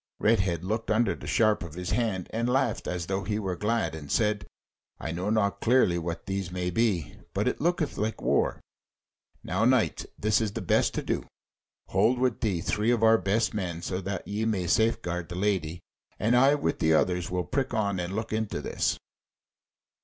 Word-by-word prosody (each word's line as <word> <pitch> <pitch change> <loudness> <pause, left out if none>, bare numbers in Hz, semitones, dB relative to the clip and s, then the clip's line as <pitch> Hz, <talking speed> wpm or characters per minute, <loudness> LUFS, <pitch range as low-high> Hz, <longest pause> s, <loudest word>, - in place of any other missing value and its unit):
Redhead 95 -6 +2
looked 110 +4 -2
under 115 +2 +3
the - - -9
sharp 110 -2 +3
of 85 -3 -7
his 90 0 -4
hand, 105 -5 0
and 115 +2 0
laughed 130 -3 0
as 90 -2 -2
though 95 +2 -2
he 105 +2 -1
were 95 -4 -2
glad, 105 -5 0
and 75 -3 -7
said: 105 -4 +1 0.5
"I 80 - -4
know 90 +5 -2
not 100 -2 +1
clearly 115 -8 +3
what 85 +2 -5
these 95 -2 -3
may 90 0 -2
be, 95 -5 0 0.2
but - - +1
it - - -1
looketh 165 -2 0
like 110 +2 -1
war. - - +1 0.8
Now, 95 +5 -1
knight, 125 -1 +2
this 110 +1 +2
is 110 - 0
best - - +1
to - - -2
do: - - -2 0.6
hold 110 +7 +3
with 125 -2 0
thee 100 -8 0
three 105 +6 0
of 120 -2 +2
our 115 0 +6
best 105 +4 +1
men, 90 -5 -3
so 90 +2 -2
that 95 -1 -4
ye 105 +2 -2
may 105 -5 0
safe 110 +6 +2
guard 90 -1 -3
the 85 - -5
Lady, 90 -4 -1 0.4
and 115 +3 +2
I 135 +4 +6
with 80 - -1
the 80 0 +4
others 90 +1 +1
will 90 0 -1
prick 135 -2 -1
on 100 -3 0
and 90 +2 -3
look 110 0 -3
into 110 -1 -1
this." - - -1
100 Hz, 195 wpm, -28 LUFS, 90-110 Hz, 0.8 s, our